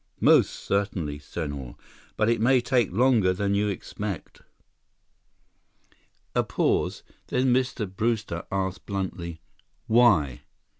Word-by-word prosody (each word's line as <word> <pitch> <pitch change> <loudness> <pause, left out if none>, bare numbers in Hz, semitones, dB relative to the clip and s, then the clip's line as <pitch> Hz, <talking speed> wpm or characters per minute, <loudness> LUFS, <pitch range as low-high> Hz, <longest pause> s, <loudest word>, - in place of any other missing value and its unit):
"Most - - +5
certainly, 90 -7 -2
Senhor. 70 -4 -6 0.4
But 110 - +2
it 115 -2 +2
may 130 +3 +5
take 120 -4 +1
longer 110 -3 +3
than 100 +2 -1
you 105 +1 +1
expect." 100 -2 -5 1.9
A - - +2
pause—then 130 0 -1
Mr. 125 -3 0
Brewster 105 -3 -2
asked 95 -1 -3
bluntly, 90 -4 -4 0.4
"Why?" 110 - +4
100 Hz, 100 wpm, -26 LUFS, 85-115 Hz, 1.9 s, Most